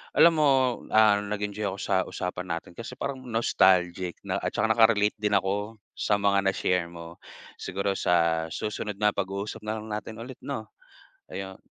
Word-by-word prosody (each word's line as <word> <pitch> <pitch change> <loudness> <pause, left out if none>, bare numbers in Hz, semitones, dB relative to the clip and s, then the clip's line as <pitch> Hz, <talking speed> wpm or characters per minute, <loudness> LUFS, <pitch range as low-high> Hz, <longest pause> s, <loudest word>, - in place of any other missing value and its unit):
alam 170 0 +7
mo, 150 - +5 0.5
ah, 105 -2 +6
nag-enjoy 105 0 -3
ako 95 0 -4
sa 95 - 0
usapan 90 0 -4
natin 85 - -8
kasi 115 +2 -7
parang 135 +1 -4
nostalgic 95 -6 +2
na 100 0 -2
at - - -3
tsaka 110 +2 +1
naka-relate 110 -2 +4
din 105 -1 0
ako 100 +3 -1 0.2
sa 105 - +2
mga 100 0 +3
na-share 90 -2 +1
mo. 85 0 -10 0.4
Siguro 100 +1 -2
sa 85 -2 +2
susunod 105 -1 -3
na 105 0 +3
pag-uusap 100 +1 -3
na 110 +1 -2
lang 110 - -10
natin 105 +1 -5
ulit 125 +2 -9
'no, 120 -6 -5 0.7
ayun. 95 -1 -6
100 Hz, 165 wpm, -27 LUFS, 95-110 Hz, 0.7 s, alam